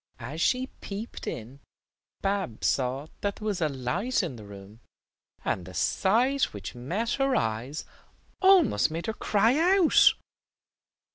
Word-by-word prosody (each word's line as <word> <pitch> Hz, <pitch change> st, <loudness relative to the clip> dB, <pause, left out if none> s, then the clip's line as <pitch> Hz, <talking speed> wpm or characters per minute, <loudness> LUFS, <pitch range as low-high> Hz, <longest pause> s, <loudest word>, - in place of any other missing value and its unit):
As 140 Hz, +7 st, -6 dB
she 255 Hz, +6 st, +2 dB
peeped 215 Hz, -3 st, -8 dB
in, 120 Hz, +5 st, -6 dB, 0.6 s
Babs 195 Hz, -, -2 dB
saw 130 Hz, +2 st, 0 dB
that 200 Hz, 0 st, -2 dB
there 215 Hz, -, -9 dB
was 205 Hz, -4 st, -1 dB
a 155 Hz, -, +2 dB
light 170 Hz, -, -1 dB
in 160 Hz, -8 st, -4 dB
the 105 Hz, -3 st, -11 dB
room, 100 Hz, +2 st, -12 dB, 0.7 s
and 90 Hz, -, -1 dB
the 90 Hz, -, -10 dB
sight 250 Hz, +8 st, +2 dB
which 100 Hz, -1 st, -7 dB
met 180 Hz, -, -3 dB
her 270 Hz, -1 st, +1 dB
eyes 115 Hz, +7 st, -2 dB, 0.6 s
almost 375 Hz, -, +5 dB
made 165 Hz, +2 st, -4 dB
her 220 Hz, -, -2 dB
cry 270 Hz, -, +3 dB
out. 345 Hz, -5 st, +6 dB
175 Hz, 140 wpm, -27 LUFS, -, 0.7 s, out